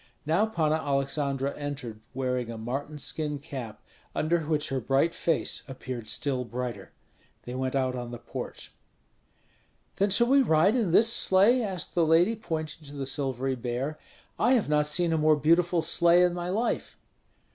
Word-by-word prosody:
Now 170 +8 +2
Panna 160 -7 +1
Aleksandra 140 -1 -1
entered, 135 -7 -6
wearing 125 -2 -2
a 115 - -6
marten 135 +7 -4
skin 150 0 -2
cap, 135 -6 -8 0.3
under 170 +2 +1
which 155 -1 0
her 135 - -1
bright 135 +7 +1
face 165 -2 0
appeared 130 -4 -6
still 135 -4 0
brighter. 120 -4 -6 0.5
They 125 - -7
went 130 +1 -2
out 130 -1 +1
on 120 -1 -5
the 120 - -6
porch. 120 - -8 1.2
"Then 200 +1 +2
shall 220 +5 +4
we 275 +3 +5
ride 190 -1 +3
in 225 -7 +1
this 225 +7 +5
sleigh?" 205 +7 +5
asked 190 -7 -3
the 170 - +2
lady, 165 +7 +4
pointing 160 -6 -5
to 145 - -9
the 140 -1 -4
silvery 135 -1 -2
bear. 130 +4 -4 0.4
"I 255 - +4
have 240 -5 +2
not 150 0 +2
seen 170 +2 +1
a 160 - +1
more 155 0 +4
beautiful 170 +3 +2
sleigh 170 +1 +4
in 180 -1 +2
my 175 0 -4
life." 220 +6 -2
150 Hz, 170 wpm, -27 LUFS, 130-175 Hz, 1.2 s, we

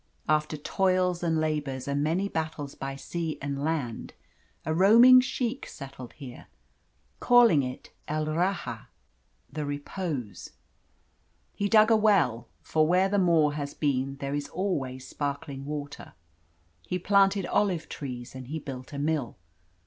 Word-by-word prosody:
After 155 0 +1
toils 185 +2 +1
and 165 -2 +1
labours, 145 -4 -2
and 140 0 0
many 175 +6 0
battles 160 -5 -4
by 135 0 -5
sea 165 +3 -4
and 140 0 -4
land, 145 -8 -3 0.5
a 160 - 0
roaming 230 +8 +8
sheikh 250 0 -3
settled 135 -3 -10
here, 130 -5 -11 0.7
calling 235 -11 +6
it 125 -1 -6 0.2
El 155 0 -1
Rahah 155 - -2 0.7
the 155 - -3
Repose. 145 - -5 1.0
He 200 0 -1
dug 215 +1 +6
a - - +7
well 195 - +2 0.2
for 155 -1 +2
where 185 +3 +3
the 205 0 +2
Moor 165 -5 +3
has 145 -1 -5
been 135 -2 -1
there 140 0 -4
is 145 0 -3
always 135 -9 -3
sparkling 140 -1 -4
water 145 -1 -6 0.7
he 180 - -1
planted 195 +1 +3
olive 185 -6 0
trees, 125 -4 -7
and 130 -1 -9
he 155 +4 -4
built 135 -3 -8
a - - -5
mill. 145 -5 -1
155 Hz, 140 wpm, -27 LUFS, 140-185 Hz, 1.0 s, roaming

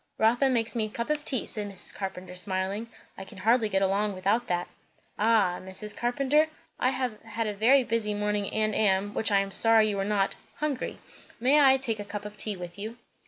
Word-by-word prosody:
"Rotha 240 +5 +3
makes 235 -2 0
me 225 -2 +1
a - - -6
cup 235 +6 -3
of 300 -1 -1
tea," 260 -5 0
said 210 -2 -4
Mrs. 195 -2 -4
Carpenter 190 -2 -6
smiling. 190 +4 -3 0.3
"I - - -6
can 195 +1 -13
hardly 225 +3 +2
get 195 -1 +1
along 200 +1 +1
without 205 +6 0
that." 175 0 -1 0.5
"Ah! 210 -5 +3
Mrs. 190 +3 -8
Carpenter, 275 +5 +2 0.3
I 255 - +3
have 255 -5 -3
had 225 0 -4
a 225 +6 +4
busy 225 -3 -1
morning 210 -1 -1
and 215 0 0
am 205 -1 +1
which 220 - 0
I 200 -1 +4
am 195 0 -4
sorry 220 +2 +5
you 200 -1 -2
are - - +1
not 200 -1 0 0.2
hungry. 300 -4 -3 0.4
May 265 +5 +4
I 270 -2 +6
take 230 -5 -3
a - - -3
cup 205 0 -7
of 210 0 -8
tea 210 -1 -2
with 175 +1 -8
you?" 220 +3 -6
210 Hz, 210 wpm, -28 LUFS, 195-235 Hz, 0.5 s, I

